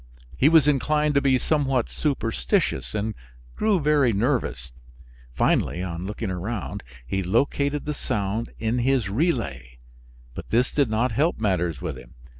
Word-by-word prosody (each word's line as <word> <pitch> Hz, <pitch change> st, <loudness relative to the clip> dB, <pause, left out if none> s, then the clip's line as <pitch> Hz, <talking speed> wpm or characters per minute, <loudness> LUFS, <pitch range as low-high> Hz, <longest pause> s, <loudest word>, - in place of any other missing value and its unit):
He 140 Hz, -, +4 dB
was 160 Hz, -3 st, +5 dB
inclined 150 Hz, +1 st, +2 dB
to 140 Hz, -, +3 dB
be 135 Hz, -2 st, +3 dB
somewhat 135 Hz, -4 st, +1 dB
superstitious 110 Hz, -, -1 dB
and 105 Hz, +1 st, -1 dB, 0.4 s
grew 215 Hz, -4 st, +2 dB
very 145 Hz, -4 st, +3 dB
nervous; 105 Hz, -, -1 dB, 0.6 s
finally, 85 Hz, +7 st, +1 dB
on 90 Hz, 0 st, -4 dB
looking 105 Hz, -1 st, -4 dB
around, 95 Hz, -, -4 dB, 0.2 s
he 95 Hz, +10 st, -1 dB
located 140 Hz, +9 st, 0 dB
the 150 Hz, -, -2 dB
sound 105 Hz, -3 st, -2 dB
in 115 Hz, +2 st, -1 dB
his 125 Hz, -4 st, +1 dB
relay, 70 Hz, -, -1 dB, 0.6 s
but -, -, -8 dB
this 120 Hz, +3 st, +2 dB
did 140 Hz, -5 st, +1 dB
not 115 Hz, +3 st, +1 dB
help 150 Hz, +9 st, +1 dB
matters 90 Hz, -, 0 dB
with -, -, -4 dB
him. -, -, -16 dB
115 Hz, 145 wpm, -24 LUFS, 95-140 Hz, 0.6 s, was